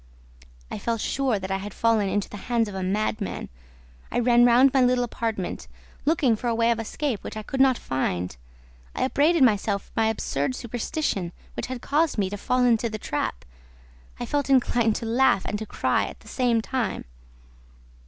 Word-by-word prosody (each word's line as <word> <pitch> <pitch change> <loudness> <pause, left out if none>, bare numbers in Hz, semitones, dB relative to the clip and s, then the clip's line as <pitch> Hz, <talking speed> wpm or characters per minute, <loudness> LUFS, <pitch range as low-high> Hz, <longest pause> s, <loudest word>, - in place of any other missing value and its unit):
I - - -4
felt 230 -1 -1
sure 260 -1 0
that 190 0 -5
I 195 - +1
had 200 +1 -7
fallen 225 -3 +2
into 205 0 -1
the 205 - -9
hands 230 -2 +2
of 205 - -7
a 190 - -4
madman. 205 +2 -2 0.6
I - - -1
ran 240 0 +5
round 250 +3 +6
my 265 - +4
little 250 0 +3
apartment, 225 -5 -3 0.4
looking 285 -6 +3
for 240 - -4
a 230 - +1
way 230 +1 +3
of 230 - 0
escape 230 0 -3
which - - -6
I 215 - -5
could 265 +4 -1
not 265 -2 +5
find. 90 - -2 0.6
I - - 0
upbraided 295 +3 +3
myself 205 -4 +2
for - - -24
my 225 -1 +2
absurd 220 - -1
superstition, 235 - -3 0.2
which - - -4
had 250 -1 -6
caused 305 0 +1
me 195 -2 0
to 205 - -4
fall 250 +5 +1
into 235 -1 +2
the 215 - -4
trap. 145 - -3 0.7
I 240 - -3
felt 285 +3 -1
inclined 240 -4 +3
to - - -4
laugh 230 -3 +3
and 210 - -2
to 220 - -6
cry - - +1
at - - -10
the - - -18
same 240 -3 +1
time. 245 -5 -2
230 Hz, 195 wpm, -25 LUFS, 205-255 Hz, 0.7 s, round